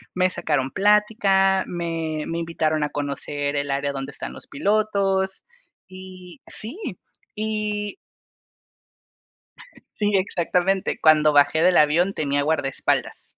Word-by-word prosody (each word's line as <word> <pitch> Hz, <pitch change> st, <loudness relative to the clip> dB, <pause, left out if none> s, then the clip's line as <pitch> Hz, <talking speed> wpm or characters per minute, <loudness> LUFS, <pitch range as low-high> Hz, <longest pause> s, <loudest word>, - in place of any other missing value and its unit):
Me 185 Hz, 0 st, +3 dB
sacaron 145 Hz, -6 st, -1 dB
plática, 200 Hz, -2 st, +3 dB
me 165 Hz, -3 st, -3 dB
me 165 Hz, 0 st, -3 dB
invitaron 155 Hz, -2 st, -1 dB
a 145 Hz, -, -1 dB
conocer 145 Hz, 0 st, -3 dB
el 140 Hz, 0 st, -2 dB
área 140 Hz, +1 st, -1 dB
donde 135 Hz, +1 st, -5 dB
están -, -, -7 dB
los -, -, -13 dB
pilotos 195 Hz, 0 st, 0 dB, 0.4 s
y 185 Hz, -1 st, -12 dB
sí 235 Hz, -, -7 dB, 0.6 s
y 210 Hz, -1 st, -1 dB, 2.1 s
sí, 210 Hz, 0 st, +1 dB
exactamente. 185 Hz, 0 st, 0 dB
Cuando 155 Hz, -1 st, +5 dB
bajé 145 Hz, +3 st, +4 dB
del 180 Hz, -1 st, +4 dB
avión 170 Hz, +6 st, +3 dB
tenía 145 Hz, -1 st, 0 dB
guardaespaldas. 145 Hz, -3 st, -1 dB
175 Hz, 110 wpm, -23 LUFS, 150-195 Hz, 2.1 s, Cuando